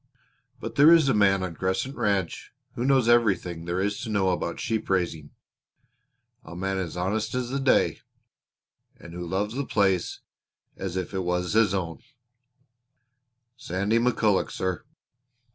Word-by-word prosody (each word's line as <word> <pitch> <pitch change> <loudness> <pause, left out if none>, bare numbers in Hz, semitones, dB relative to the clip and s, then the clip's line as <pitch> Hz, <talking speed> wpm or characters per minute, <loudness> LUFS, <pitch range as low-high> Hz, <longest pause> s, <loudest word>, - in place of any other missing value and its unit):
But - - -6
there 145 +4 +8
is 160 -5 +6
a - - +3
man 95 -2 +3
on 90 -2 -4
Crescent 95 - -2
Ranch 100 -4 -1 0.2
who 120 - -3
knows 130 -3 +3
everything 95 -8 +2
there 85 +1 -2
is 100 +1 -1
to 115 - -5
know 100 -3 +1
about 85 -1 -3
sheep 110 -1 -2
raising 85 -5 -1 1.1
a 80 - -10
man 95 +2 -2 0.2
honest 105 +7 -1
as 125 -1 -2
the 140 - -1
day, 135 -1 +2 1.0
and 85 - -12
who 90 0 -5
loves 95 +5 -2
the 140 +3 -2
place 95 -7 0 0.5
as 95 -1 -5
if 90 0 -4
it 95 - -1
was 90 0 -1
his 110 -3 +3
own 85 -4 -3 1.6
Sandy 105 -1 -1
McCulloch, 115 -4 +2
sir. 95 -3 -3
95 Hz, 145 wpm, -26 LUFS, 90-115 Hz, 1.6 s, there